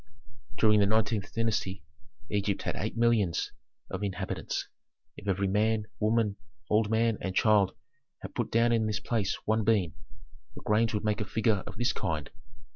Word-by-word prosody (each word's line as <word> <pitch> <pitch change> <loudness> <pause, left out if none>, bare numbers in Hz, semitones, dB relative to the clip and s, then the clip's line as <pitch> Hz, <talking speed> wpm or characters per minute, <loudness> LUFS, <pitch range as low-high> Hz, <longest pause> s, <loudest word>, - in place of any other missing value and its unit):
"During 105 -1 +5
the 100 - +4
nineteenth 105 -1 +1
dynasty 110 -4 -1 0.5
Egypt 100 -1 0
had - - -2
eight 110 +3 -3
millions 115 -7 +2 0.4
of 95 - -3
inhabitants. 100 -3 -3 0.5
If 100 - -11
every 100 0 +1
man, 105 +2 +1
woman, 110 -1 +1 0.3
old 105 0 +3
man, 115 0 +2
and 95 -1 -3
child 105 -3 +4 0.5
had - - -7
put - - -2
down 115 +1 +3
in 115 -2 +2
this 110 0 -1
place 105 -6 -1
one 110 0 +2
bean, 100 -7 +2 0.6
the - - -9
grains 110 +1 +2
would 105 - -2
make 105 0 0
a - - -1
figure 110 -1 +1
of 105 -1 -8
this 120 +2 +1
kind." 80 -8 -3
105 Hz, 165 wpm, -29 LUFS, 100-110 Hz, 0.6 s, During